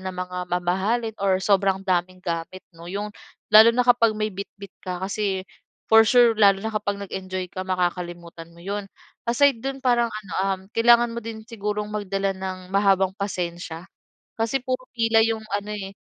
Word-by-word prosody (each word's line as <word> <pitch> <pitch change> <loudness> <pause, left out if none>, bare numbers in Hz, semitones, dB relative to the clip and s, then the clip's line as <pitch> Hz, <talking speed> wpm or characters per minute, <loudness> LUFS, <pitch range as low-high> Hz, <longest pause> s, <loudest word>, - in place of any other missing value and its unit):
ng 185 -1 -6
mga 180 0 -4
mamahalin 190 +6 0
or 195 -1 +3
sobrang 195 -1 +2
daming 185 0 -1
gamit 170 +2 -4
'no, 170 +1 -12
'yong 205 +3 -4 0.4
lalo 220 +2 +10
na 250 - +3
kapag 230 -3 +4
may 215 0 -2
bitbit 200 0 -9
ka, 180 -1 -4
kasi 195 -1 -2 0.5
for 225 -1 +7
sure 240 -2 +6
lalo 200 -1 +6
na 220 - -2
kapag 205 -1 -2
nag-enjoy 185 -1 -5
ka 185 0 -6
makakalimutan 175 -2 -3
mo 170 - -15
'yon. 200 0 -4 0.4
Aside 275 -1 +3
do'n 270 0 -5
parang 240 -2 +3
ano 215 -3 -8 0.2
um, 190 -1 -1
kailangan 235 0 +5
mo 235 - -4
din 220 -1 -8
sigurong 210 -2 -4
magdala 195 -1 -1
ng 190 -1 -7
mahabang 195 -1 +3
pasensya. 175 -4 -5 0.5
Kasi 230 +4 0
puro 255 0 -3
pila 225 -2 +3
'yong 225 -1 -1
ano 205 +1 -3
eh, 195 -2 -6
200 Hz, 170 wpm, -24 LUFS, 185-225 Hz, 0.5 s, lalo